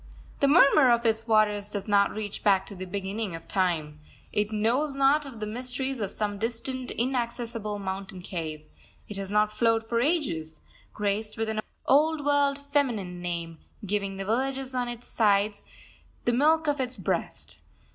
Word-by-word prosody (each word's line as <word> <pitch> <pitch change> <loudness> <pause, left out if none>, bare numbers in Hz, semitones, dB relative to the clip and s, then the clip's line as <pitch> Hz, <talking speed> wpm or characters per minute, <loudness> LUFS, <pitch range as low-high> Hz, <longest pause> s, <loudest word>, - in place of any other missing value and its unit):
The 280 - +4
murmur 280 -3 +6
of 235 0 +3
its 225 0 +1
waters 210 -2 +3
does 205 0 -5
not 200 -1 +4
reach 210 -1 -5
back 195 -2 +4
to 200 - -10
the 185 0 -6
beginning 195 0 -3
of 165 - -10
time. 160 -6 0 0.3
It 210 +1 0
knows 245 +7 +1
naught 275 +2 +3
of 240 -5 -10
the 215 - -3
mysteries 250 +3 -4
of 200 - -1
some 205 -1 -2
distant, 245 +3 -3
inaccessible 235 -3 -2
mountain 190 -1 -5
cave. 155 -4 -5 0.4
It 210 - -7
has 195 -1 -4
not 210 +1 +2
flowed 225 0 +2
for 230 +1 -1
ages, 200 - -1 0.3
graced 210 +1 -2
with 225 0 -1
an 215 0 -1 0.2
old 300 +1 +3
world 285 -1 +3
feminine 250 -11 -1
name, 170 -2 -4 0.3
giving 200 -1 -2
the 195 - -4
villages 265 +4 -1
on 250 -1 -1
its 240 0 -6
sides 205 -1 +2 0.6
the 240 - +2
milk 315 +5 +3
of 290 -2 +1
its 250 0 -3
breast. - - -3
220 Hz, 165 wpm, -27 LUFS, 200-260 Hz, 0.6 s, murmur